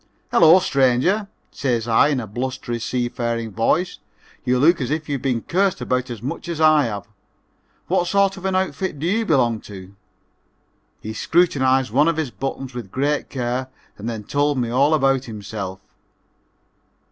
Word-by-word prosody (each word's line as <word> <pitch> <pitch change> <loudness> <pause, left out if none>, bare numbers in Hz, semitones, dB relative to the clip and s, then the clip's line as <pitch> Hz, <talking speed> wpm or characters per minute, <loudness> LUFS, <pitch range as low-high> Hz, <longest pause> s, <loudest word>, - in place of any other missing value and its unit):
"Hello, 165 +1 +7
stranger," 140 - +2 0.2
says 120 -4 -1
I 115 +4 +4
in 145 -3 0
a 120 - -4
blustery, 120 +2 -4
seafaring 120 -2 -2
voice, 155 - 0 0.4
"you 125 0 +1
look 160 +5 +4
as 125 - -2
if 155 +1 -2
you'd 140 -4 -2
been 125 -4 -1
cursed 190 +1 +1
at - - -13
about 125 +1 -1
as 120 -1 -7
much 140 +6 -5
as 165 -2 -4
I 155 -2 +5
have. 105 -4 -4 0.8
What 175 - +1
sort 195 +1 +2
of 190 -1 -9
an 190 -1 0
outfit 190 -3 -1
do 150 - -4
you 220 +5 0
belong 120 -7 +2
to?" 95 -1 -10 1.1
He 110 - -6
scrutinized 130 - +2
one 145 +6 +3
of 165 -1 +1
his 155 -6 -2
buttons 135 0 -5
with 120 -6 -7
great 145 +3 -1
care 125 0 -2 0.3
and 110 +3 -5
then 110 -2 -5
told 145 +5 0
me 120 -2 -1
all 140 +5 +3
about 135 -2 +2
himself. 100 -3 -6
130 Hz, 170 wpm, -21 LUFS, 120-155 Hz, 1.1 s, Hello